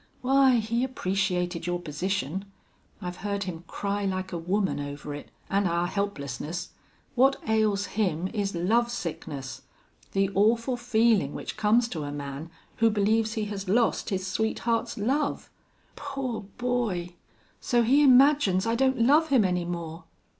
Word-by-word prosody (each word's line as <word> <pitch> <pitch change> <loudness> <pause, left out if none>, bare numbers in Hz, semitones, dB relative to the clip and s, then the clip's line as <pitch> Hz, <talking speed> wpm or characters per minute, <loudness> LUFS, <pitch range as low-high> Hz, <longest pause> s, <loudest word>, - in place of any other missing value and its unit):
Why, 265 0 +4
he 230 +1 0
appreciated 185 -7 -1
your 175 0 -1
position. 180 +2 -3 0.6
I've 180 0 -5
heard 200 0 -2
him 175 -3 -6
cry 200 0 -2
like 185 -1 -2
a - - -1
woman 190 +1 0
over 145 +1 -6
it 145 - -8 0.2
an' 200 0 +1
our 170 0 +1
helplessness. 175 -4 -4 0.4
What 270 +1 +4
ails 215 -2 +2
him 185 -4 -1
is 200 -3 -1
lovesickness, 170 - -2 0.5
the 195 0 +1
awful 230 +5 +2
feelin' 230 - +2
which - - -5
comes 225 +3 +3
to 160 -7 -4
a 145 - -4
man 145 +2 -6 0.3
who 230 0 +4
believes 215 +1 +1
he 220 -2 -2
has 195 -1 -5
lost 230 +3 +2
his 190 -2 -2
sweetheart's 225 +4 -1
love." 270 +8 -1 0.4
"Poor 270 -7 -4
boy! 230 -9 -1 0.5
So 240 -1 +2
he 270 +6 +4
imagines 265 -8 +5
I 230 - +1
don't 260 0 +2
love 300 +6 +5
him 255 -7 +4
any 180 -1 0
more? 170 -1 -5
200 Hz, 145 wpm, -27 LUFS, 175-235 Hz, 0.6 s, imagines